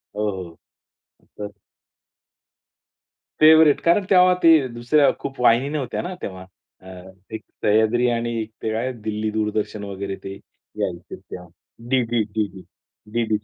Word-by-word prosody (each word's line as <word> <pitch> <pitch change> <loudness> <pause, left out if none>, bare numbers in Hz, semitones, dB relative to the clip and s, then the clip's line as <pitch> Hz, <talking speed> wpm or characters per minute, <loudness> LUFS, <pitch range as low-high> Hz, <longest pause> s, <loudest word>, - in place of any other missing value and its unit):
हो, 105 0 -1
हो. 90 -3 -8 0.8
तर 105 - -4 1.9
फेव्हरेट, 155 -1 +6
कारण 175 +4 +3
तेव्हा 180 -1 +6
ते 160 -5 +6
दुसऱ्या 120 +5 +2
खूप 135 -1 -7
वाहिनी 125 +3 +4
नव्हत्या 145 -5 -3
ना 180 +2 -5
तेव्हा. 95 -1 -7 0.4
अ, 95 - -15 0.5
एक 110 - -6 0.2
सह्याद्री 110 +3 +3
आणि 120 0 -1 0.3
ते 110 - -2
काय 120 +4 -1
दिल्ली 110 0 -2
दूरदर्शन 105 -1 -2
वगैरे 100 -1 -5
ते 95 - -6 0.5
यायचे 85 -1 -4
तेव्हा. 90 0 -11 0.4
DD, 120 -3 +1
DD, 100 -4 -3 0.5
DD 110 -2 0
115 Hz, 125 wpm, -22 LUFS, 105-135 Hz, 1.9 s, फेव्हरेट